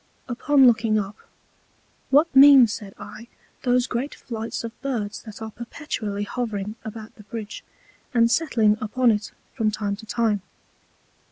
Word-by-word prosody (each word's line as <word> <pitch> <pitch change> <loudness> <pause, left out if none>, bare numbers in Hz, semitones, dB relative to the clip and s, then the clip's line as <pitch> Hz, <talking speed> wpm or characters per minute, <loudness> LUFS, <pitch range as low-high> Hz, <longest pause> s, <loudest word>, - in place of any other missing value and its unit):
Upon 270 +2 +3
looking 225 -2 +4
up, 205 0 -3 0.9
What 290 +3 +3
mean, 275 -2 +9
said 210 -3 -6
I, 230 - -10 0.3
those 250 -1 +2
great 260 +3 -3
Flights 225 -1 -5
of 230 - -5
Birds 230 -7 -3
that 220 -1 -10
are 220 - -6
perpetually 220 -4 -5
hovering 210 -2 -4
about 220 0 -8
the 210 - -13
Bridge, 215 -1 -7 0.5
and 235 -2 +3
settling 225 -10 +2
upon 240 +3 +2
it 210 -1 -2 0.2
from 225 -4 0
time 205 -1 -2
to 220 +1 -13
time? 220 -3 0
225 Hz, 145 wpm, -24 LUFS, 210-250 Hz, 0.9 s, mean